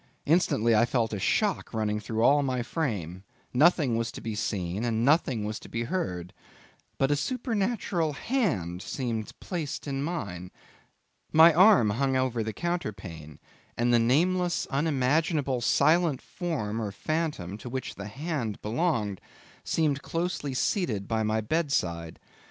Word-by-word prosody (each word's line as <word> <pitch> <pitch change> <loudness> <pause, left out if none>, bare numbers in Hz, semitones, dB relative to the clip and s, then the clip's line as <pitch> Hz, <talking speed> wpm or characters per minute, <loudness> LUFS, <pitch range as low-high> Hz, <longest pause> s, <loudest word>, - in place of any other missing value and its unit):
Instantly 130 -8 +3
I 110 +2 +5
felt 115 -3 0
a 105 - -2
shock 195 - 0
running 105 -1 0
through 110 +2 -2
all 145 +4 +5
my 130 -3 -1
frame; 100 - -3 0.3
nothing 145 -2 +4
was 115 0 -1
to - - -7
be 115 - -4
seen, 100 -2 -2
and 115 -1 0
nothing 135 -6 +2
was 105 +1 -4
to - - -13
be 115 - -2
heard; 90 - -3 0.6
but 135 +1 +2
a - - +4
supernatural 205 - -1
hand 120 - -1
seemed 115 -4 -3
placed 165 -6 -4
in 135 -2 -2
mine. 100 - -4 0.8
My 160 +1 +8
arm 180 - +6
hung 135 +4 +1
over 130 -3 0
the 110 0 -2
counterpane, 95 - -5 0.4
and 120 +1 +2
the 120 - +6
nameless, 175 +9 +2
unimaginable, 140 -1 +1
silent 160 +3 +3
form 115 - -3
or 105 -2 -3
phantom, 150 - -2
to 120 - -7
which 130 +1 -4
the 100 +1 -7
hand 130 -2 -3
belonged, 110 - -1 0.4
seemed 150 -4 0
closely 165 -5 -3
seated 125 - 0
by 110 -1 0
my 110 0 +1
bed 155 +7 -1
side. 85 - -1
130 Hz, 145 wpm, -28 LUFS, 105-160 Hz, 0.8 s, My